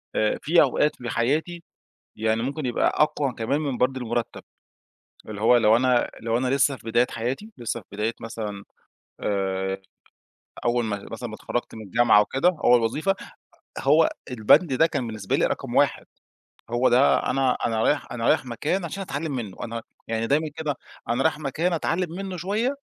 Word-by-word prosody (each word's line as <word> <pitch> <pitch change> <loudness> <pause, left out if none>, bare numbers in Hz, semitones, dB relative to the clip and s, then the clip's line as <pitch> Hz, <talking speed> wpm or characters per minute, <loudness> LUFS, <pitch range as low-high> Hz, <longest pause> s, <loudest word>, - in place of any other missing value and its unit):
آآ، 110 0 +1
في 165 +4 +5
أوقات 150 +2 +3
في 120 -1 -6
حياتي، 155 +10 -1 0.5
يعني 110 +1 0
ممكن 140 +3 -3
يبقى 120 - +1
أقوى 150 -3 +1
كمان 120 +7 -1
من 140 -5 -2
برضه 130 +1 +1
المرتَّب. 120 0 -3 0.9
اللي 105 -1 -6
هو 115 +3 +5
لو 110 -1 +5
أنا 125 0 +2
لو 115 +1 0
أنا 130 +1 0
لسّه 140 +1 +2
في 115 - -18
بداية 120 +2 +3
حياتي 130 - -4
لسّه 120 0 -3
في 100 - -23
بداية 105 +3 -1
مثلًا، 105 -3 -6 0.6
آآ، 95 -1 -1 0.8
أول 120 0 +2
ما 105 -2 -4
مثلًا 120 +2 -5
ما 110 - -8
اتخرجت 120 +2 -4
من 110 - -8
الجامعة 110 +1 +4
وكده، 135 - +1
أول 120 0 +6
وظيفة، 150 +12 0 0.7
هو 150 +4 +5 0.2
البند 125 - +4
ده 160 +5 +5
كان 140 -6 -3
بالنسبة 110 -4 -2
لي - - +2
رقم - - -3
واحد - - +2 0.7
هو 120 +2 +3
ده 130 +3 +5
أنا 135 -2 +2
أنا 110 -1 0
رايح - - 0
أنا 115 -1 -2
رايح 145 -4 +3
مكان 150 +10 -2
عشان 180 +4 -5
أتعلِّم 155 -2 -4
منّه 110 -7 -5
أنا 115 0 -4 0.3
يعني 115 0 -1
دايمًا 150 +4 +1
كده، 150 -3 -2 0.3
أنا 120 +3 +1
رايح 160 -1 +1
مكان 160 +5 -1
أتعلّم 170 +1 -1
منّه 190 -1 -5
شوية، 210 - -1
125 Hz, 175 wpm, -24 LUFS, 115-150 Hz, 0.9 s, أول